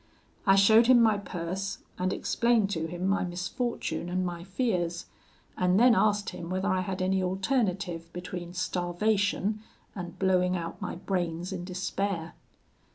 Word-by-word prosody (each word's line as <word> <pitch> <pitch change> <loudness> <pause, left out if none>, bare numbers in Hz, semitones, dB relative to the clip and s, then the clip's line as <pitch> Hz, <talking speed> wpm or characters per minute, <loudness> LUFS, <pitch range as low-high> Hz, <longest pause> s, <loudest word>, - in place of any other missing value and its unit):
I 195 - +7
showed 220 +4 +6
him 255 -1 +7
my 220 -3 +4
purse, 190 +1 -4 0.2
and 185 +1 0
explained 230 -4 +1
to 160 -3 -1
him 175 +2 -4
my 200 +1 +2
misfortune 185 +2 -3
and 185 +1 0
my 175 -1 -4
fears, 180 -4 -1 0.5
and 180 +2 +2
then 245 +1 +7
asked 205 -2 +2
him 170 - -7
whether 190 +2 -1
I 185 -2 +2
had 185 0 -3
any 190 0 +1
alternative 185 -4 -1
between 175 0 -6
starvation 195 +3 0 0.3
and 175 -3 -7
blowing 185 -1 +2
out 170 -1 -6
my - - -3
brains 175 -1 -2
in 175 - -5
despair. 185 -2 -3
185 Hz, 150 wpm, -28 LUFS, 175-200 Hz, 0.5 s, I